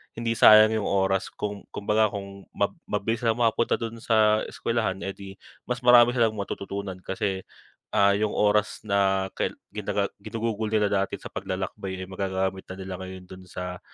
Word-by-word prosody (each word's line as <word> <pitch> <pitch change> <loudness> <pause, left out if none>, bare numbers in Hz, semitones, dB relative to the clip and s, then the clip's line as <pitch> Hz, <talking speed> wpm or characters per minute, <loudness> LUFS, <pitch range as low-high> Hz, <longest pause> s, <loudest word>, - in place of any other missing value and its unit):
hindi 115 0 -2
sayang 110 0 +8
'yong 105 - -3
oras. 95 0 +1
Kung 105 -1 -5
kumbaga, 105 +1 +2
kung 100 -1 -8
ma - - +1 0.2
mabilis 115 +2 -1
silang 115 -1 +2
makapunta 115 0 +2
do'n 115 0 -4
sa 110 -1 +4
eskwelahan 110 -5 -2
e'di 95 0 -7 0.3
mas 125 0 -2
marami 120 -1 +7
silang 115 -3 +2
matututunan, 100 -1 -5
kasi, 95 0 -2 0.5
ah, 100 0 +5
'yong 105 +1 0
oras 105 0 +2
na 95 -1 +2
kai - - 0 0.2
gina - - -1
ginugugol 110 -1 -3
nila 105 -2 +3
dati 100 -1 0
sa - - -10
paglalakbay 95 0 -4
ay - - -9
magagamit 95 0 -2
na 95 - -6
nila 95 0 -6
ngayon 95 0 -8
do'n 95 +1 -12
sa, 90 -1 -6
100 Hz, 165 wpm, -26 LUFS, 95-110 Hz, 0.5 s, sayang